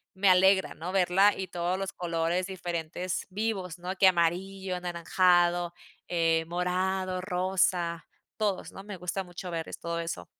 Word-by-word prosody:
me 190 +1 +3
alegra, 190 +1 +5
¿no?, 170 +4 -5
verla, 195 +2 +4
y 190 - -3
todos 175 +1 -1
los 195 0 -3
colores 170 +1 -1
diferentes, 175 -1 -4
vivos, 195 -3 -2
¿no?, 180 +2 -4
que 190 - +6
amarillo, 185 +2 +1
anaranjado, 175 0 +2 0.4
eh, 165 -1 +2
morado, 185 +2 -1
rosa, 180 -2 0 0.3
todos, 205 -3 -1
¿no? 195 - -9
Me 205 -1 -6
gusta 180 +2 -3
mucho 175 +1 -7
ver 165 -1 -3
es - - -7
todo 170 0 -2
eso. 165 - -4
180 Hz, 150 wpm, -29 LUFS, 170-190 Hz, 0.4 s, que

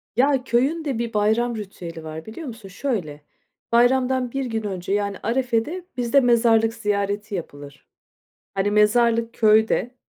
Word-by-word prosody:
Ya, 265 +2 +3
köyün 270 +7 0
de 270 -5 -2
bir 235 -1 -3
bayram 220 +3 +1
ritüeli 180 -5 -8
var, 160 0 -7
biliyor 255 +8 -8
musun? 225 -5 -9
Şöyle, 190 - -3 0.5
bayramdan 250 +1 +2
1 270 +1 -2
gün 225 -2 -3
önce, 190 -2 -3
yani, 200 -1 -1
arefede 255 - -1
bizde 245 +3 +3
mezarlık 230 -3 +3
ziyareti 205 -1 -2
yapılır. 145 -5 -9 0.7
Hani, 195 +1 0
mezarlık 230 +2 +3
köyde. 220 +3 +2
225 Hz, 135 wpm, -23 LUFS, 205-245 Hz, 0.7 s, Ya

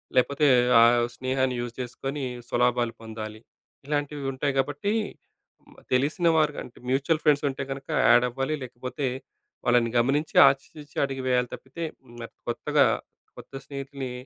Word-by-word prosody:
లేకపోతే 140 +3 +3 0.3
ఆహ్, 120 0 +5
స్నేహాన్ని 130 0 0
యూజ్ 120 -1 -5
చేసుకొని 135 +3 -5 0.3
స్వలాభాలు 120 -1 +1
పొందాలి. 110 -1 -7 0.5
ఇలాంటివి 145 -1 -2
ఉంటాయి 140 +2 -1
కాబట్టి, 145 +10 -1 1.0
తెలిసిన 145 +7 +2
వారికంటే, 150 -5 -1
మ్యూచువల్ 145 +5 +1
ఫ్రెండ్స్ 150 -1 +3
ఉంటే 135 +1 -4
కనుక 135 0 -6 0.2
యాడ్ 120 +1 +6
అవ్వాలి 135 +5 -2
లేకపోతే, 130 +2 -4 0.6
వాళ్ళని 120 -1 +3
గమనించి 140 +6 0
ఆచితూచి 145 +2 -3
అడుగు 135 -1 -5
వేయాలి 125 -1 +2
తప్పితే, 155 +6 -9 0.2
హ్మ్, 120 -1 -9 0.2
కొత్తగా - - +2 0.5
కొత్త - - -13
స్నేహితుల్ని, 140 -2 -6
135 Hz, 120 wpm, -26 LUFS, 120-145 Hz, 1.0 s, యాడ్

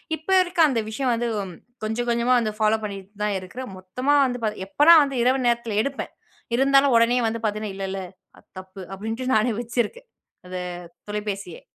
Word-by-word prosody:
இப்ப 315 +3 -14
இருக்க 355 0 -7
அந்த 250 -4 0
விஷயம் 250 +3 -1
வந்து 235 +1 -1 0.2
ம் - - -10 0.3
கொஞ்சம் 220 +3 -2
கொஞ்சமா 235 +1 +2
வந்து 220 -2 -1
ஃபாலோ 215 0 +3
பண்ணீட்டு 200 -1 -7
தான் 210 -1 0
இருக்குறேன். 240 +8 -8
மொத்தமா 250 +10 0
வந்து 245 -2 -3
பார்த் 210 -3 -2
எப்பன்னா 295 +11 +6
வந்து 275 -1 -3
இரவு 255 +1 +2
நேரத்தில 235 -3 0
எடுப்பேன். 275 +1 -4 0.4
இருந்தாலும் 275 +1 +4
உடனே 230 +2 +4
வந்து 225 +1 -2
பார்த்தீங்கன்னா, 215 -1 -2
"இல்ல 195 - -5
இல்ல 195 - -3 0.4
அது - - -21
தப்பு." 190 +1 -11
அப்படீன்ட்டு 225 +6 -3
நானே 220 +3 +3
வச்சிருக்கேன். 240 - -3 0.4
அத 185 0 -8 0.5
தொலைபேசியை. 205 -4 -5
230 Hz, 175 wpm, -24 LUFS, 210-255 Hz, 0.5 s, எப்பன்னா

